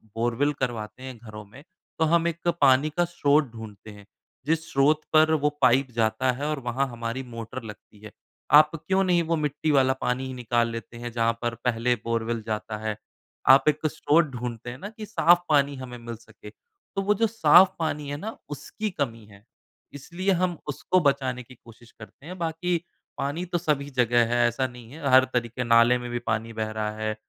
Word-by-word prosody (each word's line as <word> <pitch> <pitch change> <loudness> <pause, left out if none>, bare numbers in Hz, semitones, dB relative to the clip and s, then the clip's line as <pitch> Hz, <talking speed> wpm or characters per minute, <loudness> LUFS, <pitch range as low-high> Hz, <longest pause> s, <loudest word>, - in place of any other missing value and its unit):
Borewell 120 +5 +1
करवाते 120 -1 -4
हैं 130 -2 -8
घरों 110 -2 -10
में, 125 +8 -15 0.4
तो 160 - +4
हम 170 +1 +2
एक 170 +1 -4
पानी 135 +2 +5
का 175 - +3
स्रोत 150 -5 +1
ढूँढ़ते 110 -2 -10
हैं। 105 -1 -14 0.4
जिस 160 +2 -1
स्रोत 145 +3 +3
पर 155 0 +5
वो 150 -1 +2
पाइप 130 +1 +3
जाता 115 +3 +1
है 130 +4 -5
और 150 -2 -2
वहाँ 130 +2 -1
हमारी 120 +1 -5
मोटर 115 0 -7
लगती 105 -1 -12
है। 105 0 -11 0.5
आप 155 0 +3
क्यों 190 +5 0
नहीं 175 -2 +2
वो 165 +1 0
मिट्टी 150 0 -1
वाला 135 -2 +4
पानी 130 +1 -2
निकाल 120 -1 0
लेते 115 0 -8
हैं 120 0 -6
जहाँ 115 0 +1
पर 120 -1 -2
पहले 120 0 +1
बोरवेल 115 0 -1
जाता 110 0 -3
है। 110 - -1 0.5
आप 135 +1 +7
1-2 155 +1 0
स्रोत 155 +2 +2
ढूँढ़ते 120 -1 -6
हैं 120 - -7
ना 195 +9 -7
कि 215 0 -9
साफ़ 175 -5 +4
पानी 145 -2 +3
हमें 130 -2 -8
मिल 115 0 -7
सके। 110 -2 -14
तो 195 - -9
वो 200 +2 +2
जो 225 +2 +2
साफ़ 185 -3 +6
पानी 150 -3 -2
है 145 - -4
ना 215 +8 -7
उसकी 150 - -5
कमी 115 -9 -4
है। 100 -1 -18 0.5
इसलिए 175 +7 -3
हम 180 -2 0
उसको 150 +5 0
बचाने 135 -4 0
की 125 +2 -16
कोशिश 115 0 -18
करते 115 +5 -14
हैं। 180 +3 -8
बाकी 170 +1 -1 0.4
पानी 145 +6 -3
तो 175 0 -2
सभी 150 -4 -1
जगह 120 -3 +2
है 120 0 +4
ऐसा 130 +3 -1
नहीं 120 -1 -13
है 150 -1 -5
हर 130 0 +7
तरीक़े 120 0 -2
नाले 115 +1 +5
में 120 0 -7
भी 120 - -2
पानी 115 +1 -2
बह 110 -1 -3
रहा 110 -1 -2
है 110 0 -2
130 Hz, 200 wpm, -25 LUFS, 115-155 Hz, 0.5 s, आप